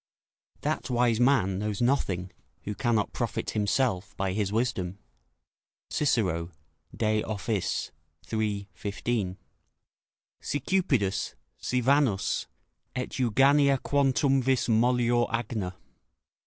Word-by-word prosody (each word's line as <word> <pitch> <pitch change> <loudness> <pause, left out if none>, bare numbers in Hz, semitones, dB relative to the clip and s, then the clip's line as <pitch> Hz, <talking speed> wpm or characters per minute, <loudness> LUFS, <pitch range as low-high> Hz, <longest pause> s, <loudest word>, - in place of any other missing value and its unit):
["That - - -2
wise 120 -2 +2
man 115 -8 +3
knows 105 -1 -2
nothing, 95 -8 0 0.3
who 105 - -3
cannot 115 -2 0
profit - - -2
himself 105 -2 0
by 95 -1 -1
his 100 -1 -1
wisdom." 100 -5 -1 0.9
Cicero, 90 - +1 0.5
De 110 -1 +2
Offic., 105 -2 -2 0.4
iii. 105 -2 -1
15.] 100 0 -2 1.0
"Si 145 - -2
cupidus, 130 - 0 0.2
si 125 0 0
Vanus, 130 -5 +2 0.5
et 125 - -2
Euganea 135 +3 +4
quantumvis 135 -1 +2
mollior 120 +1 +3
agna." 110 -5 -2
115 Hz, 95 wpm, -28 LUFS, 100-130 Hz, 1.0 s, Euganea